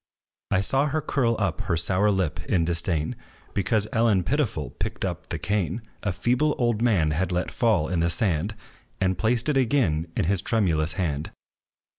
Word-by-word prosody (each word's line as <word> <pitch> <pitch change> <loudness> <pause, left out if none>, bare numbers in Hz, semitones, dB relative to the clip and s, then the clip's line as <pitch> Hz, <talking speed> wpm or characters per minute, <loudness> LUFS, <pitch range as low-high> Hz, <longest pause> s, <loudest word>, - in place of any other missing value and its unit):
I 95 - +2
saw 135 +8 +3
her 155 +2 0
curl 120 -6 0
up 95 -7 -1
her 85 - -1
sour 90 +5 +2
lip 95 -6 -1
in 90 -5 +1
disdain, 85 -2 -1 0.4
Because 105 +2 +1
Ellen 110 -5 +3
Pitiful 120 - -1
picked - - -2
up - - -5
the - - -2
cane, 100 +1 -1 0.2
A 100 - -1
feeble 125 +11 +1
old 120 -3 +1
man 95 -11 +2
had 90 +5 -1
let 90 0 -1
fall 105 -10 +2
in 90 0 -1
the 85 +1 +2
sand, 95 +1 0 0.4
And 95 -1 +1
placed 115 - +1
it 150 -3 +2
again 115 - +1
in - - +2
his 95 +2 +2
tremulous 85 -8 +1
hand. 80 -4 -2
95 Hz, 175 wpm, -25 LUFS, 85-115 Hz, 0.4 s, saw